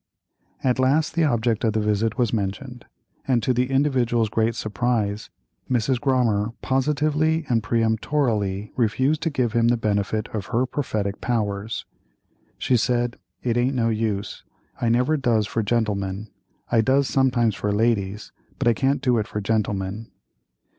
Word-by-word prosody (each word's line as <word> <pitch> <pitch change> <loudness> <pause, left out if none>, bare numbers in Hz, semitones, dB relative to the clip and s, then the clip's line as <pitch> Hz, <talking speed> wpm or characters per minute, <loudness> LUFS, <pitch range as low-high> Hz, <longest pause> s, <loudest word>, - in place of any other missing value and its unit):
At 125 -1 +1
last, 140 +5 +2
the 165 -2 +2
object 120 -4 +1
of 110 -2 +2
the 110 - +1
visit 105 +1 0
was 120 -4 +1
mentioned, 115 +4 -4 0.4
and, 125 -4 +2
to 130 - +2
the 125 +1 0
individual's 125 -5 +1
great 115 +1 0
surprise, 110 -2 -1 0.4
Mrs. 125 0 +1
Grommer 115 -6 +1
positively 150 +4 +1
and 115 -2 +2
peremptorily 110 -2 0
refused 130 +6 +1
to 165 - 0
give 125 -6 -1
him 115 0 +3
the 120 0 +3
benefit 105 -1 -1
of 105 -3 -5
her 120 +3 +1
prophetic 110 -7 -3
powers. 105 -3 -2 0.7
She 125 - +2
said: 120 +1 0 0.3
"It 120 -1 0
aint 125 +3 +1
no 115 -2 +1
use; 110 -2 -2 0.4
I 120 - +2
never 125 +7 +2
does 120 -6 +1
for 115 - -2
gentlemen. 105 -2 -1 0.4
I 115 -2 +4
does 135 +4 +2
sometimes 125 -4 +2
for 105 +1 -2
ladies, 105 -2 0 0.3
but 135 - -1
I 120 - +5
can't 135 +4 0
do 125 -3 +3
it 105 - -2
for 105 - -4
gentlemen." 105 0 -2
115 Hz, 155 wpm, -23 LUFS, 105-130 Hz, 0.7 s, I